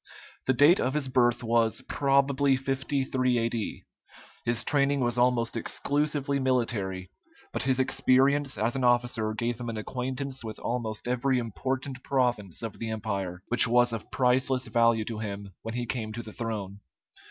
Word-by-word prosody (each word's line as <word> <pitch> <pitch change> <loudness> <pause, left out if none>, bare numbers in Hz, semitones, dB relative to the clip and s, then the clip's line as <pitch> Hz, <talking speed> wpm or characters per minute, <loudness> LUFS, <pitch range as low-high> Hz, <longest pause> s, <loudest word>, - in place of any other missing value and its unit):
The 130 - +4
date 145 +8 +6
of 130 +3 0
his 150 -3 0
birth 120 -2 +2
was 115 +1 +2
probably 140 0 +2
53 130 -1 0
A.D. 115 -1 -2 0.6
His 120 -1 +2
training 140 -1 +2
was 120 0 0
almost 120 -2 +2
exclusively 140 +3 -1
military, 105 -8 -1 0.4
but - - -1
his 130 -1 +1
experience 135 +1 +2
as 115 +5 0
an 135 - -1
officer 120 -3 +1
gave 120 +1 -2
him 120 -1 -4
an 115 - -4
acquaintance 130 +3 -4
with 110 -2 -6
almost 115 -2 -3
every 125 +1 +1
important 130 - -3
province 120 - -1
of 110 -2 -6
the 115 - -3
empire, 100 -4 -4
which 120 0 +5
was 120 0 +3
of 115 - -6
priceless 130 0 +2
value 115 -1 +2
to 110 -1 -5
him 100 -2 -6
when 115 +1 -5
he 120 0 -2
came 110 -3 -3
to 120 +1 -5
the 110 - -10
throne. 105 -4 -4
120 Hz, 160 wpm, -28 LUFS, 115-130 Hz, 0.6 s, date